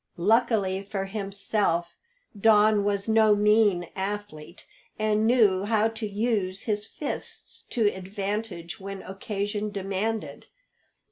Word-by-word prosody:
Luckily 200 -1 +2
for 195 -1 -4
himself 195 -3 -1 0.4
Don 210 0 +4
was 200 0 -1
no 220 -1 +5
mean 205 -4 +3
athlete, 195 -4 -6 0.3
and 215 0 +1
knew 205 -6 +4
how 220 0 +2
to 225 -1 -5
use 205 -3 -1
his 210 -1 -2
fists 295 - -7
to 230 -3 +1
advantage 195 -2 -4
when 195 0 -7
occasion 205 +2 -3
demanded. 200 +2 -3
205 Hz, 110 wpm, -26 LUFS, 195-215 Hz, 0.4 s, no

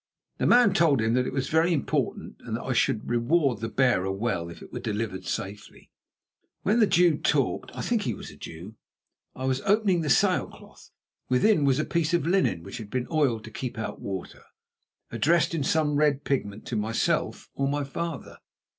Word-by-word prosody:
The - - +2
man 240 -4 +6
told 155 -6 +3
him 110 +1 +1
that 125 +1 +1
it - - -3
was 135 0 -2
very 160 +2 +2
important, 140 - -2
and - - -4
that - - -8
I - - -1
should 110 - +1
reward 120 +1 +1
the 115 0 -3
bearer 115 -8 +2
well 95 -4 -2
if 85 - -11
it - - -14
were - - -4
delivered 105 -4 -3
safely. 100 +2 -6 0.7
While 210 +4 +2
the 215 - +5
Jew 170 -4 +4
talked 140 -3 0
(I - - -4
think 235 -3 0
he - - -2
was - - -9
a - - -14
Jew) 85 +6 -9 0.6
I 130 - -5
was 130 0 0
opening 205 -4 +2
the 155 - -2
sail - - +3
cloth. - - -16 0.4
Within 150 +5 +3
was 135 -1 +3
a 155 - 0
piece 170 0 0
of 170 - 0
linen 170 - +1
which 100 +5 -8
had 105 -2 -8
been 125 +1 -2
oiled 135 -9 +1
to 110 - -10
keep 125 +1 -5
out 110 - -5
water, 95 -2 -6 0.7
addressed 170 +2 +2
in 160 -4 -1
some 150 +1 +1
red 145 -1 +2
pigment 105 -7 -2
to 120 - -4
myself 110 +1 -1
or 140 - -1
my 145 +1 -1
father. 165 +3 -5
135 Hz, 200 wpm, -26 LUFS, 110-165 Hz, 0.7 s, man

